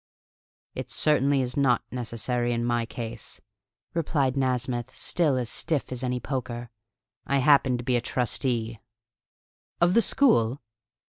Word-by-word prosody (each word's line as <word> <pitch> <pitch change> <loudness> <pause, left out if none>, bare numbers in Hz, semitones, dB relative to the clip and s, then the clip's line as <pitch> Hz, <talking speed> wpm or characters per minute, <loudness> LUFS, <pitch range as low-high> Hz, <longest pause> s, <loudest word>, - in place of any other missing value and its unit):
"It - - -6
certainly 140 -2 +3
is 125 0 -3
not 135 -4 +3
necessary 120 0 -2
in 120 0 -1
my 120 -1 0
case," 115 -2 -6 0.5
replied 145 -5 +1
Nasmyth, 130 -1 -1
still 155 -7 +1
as 125 -2 -2
stiff 150 +3 -2
as 125 0 -3
any 125 0 -1
poker. 120 -2 -4 0.6
"I 140 - +2
happen 135 -2 +4
to 120 - -6
be 125 -1 +1
a - - -1
trustee." 120 -2 -1 1.0
"Of 175 +1 +4
the 230 - +5
school?" 135 - +3
125 Hz, 135 wpm, -26 LUFS, 120-140 Hz, 1.0 s, the